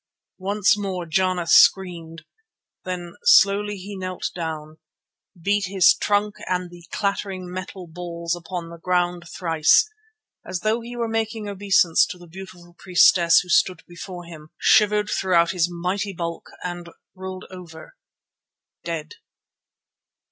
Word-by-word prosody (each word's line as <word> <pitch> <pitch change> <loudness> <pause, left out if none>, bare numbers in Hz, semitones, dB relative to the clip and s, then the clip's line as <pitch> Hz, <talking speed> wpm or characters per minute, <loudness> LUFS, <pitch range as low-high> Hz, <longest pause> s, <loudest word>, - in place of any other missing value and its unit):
Once 200 +2 +2
more 190 -4 -4
Jana 185 +1 0
screamed. 165 -3 +3 0.6
Then 175 -2 -5
slowly 205 0 +4
he 200 +2 -8
knelt 185 -1 -4
down, 155 -2 -6 0.6
beat 200 +4 +1
his 190 -3 +5
trunk 205 0 0
and 180 -1 -2
the 175 -1 -14
clattering 195 -2 -3
metal 185 0 -7
balls 170 0 -4
upon 175 0 -6
the 170 - -11
ground 175 0 0
thrice, 165 - +3 0.6
as 185 -1 -5
though 220 +4 0
he 240 +1 -8
were 235 -1 -2
making 225 -1 -2
obeisance 195 -4 +3
to - - -8
the 175 - -14
beautiful 175 0 -12
priestess 175 -2 +5
who 180 - -13
stood 185 -5 +2
before 175 +1 -9
him, 155 -2 -12
shivered 210 -1 +4
throughout 170 -3 +2
his 175 -1 +1
mighty 180 +3 -3
bulk, 170 -1 -5
and 175 -1 -6 0.2
rolled 190 0 -8
over—dead! 165 -2 -11
180 Hz, 125 wpm, -23 LUFS, 170-195 Hz, 0.6 s, his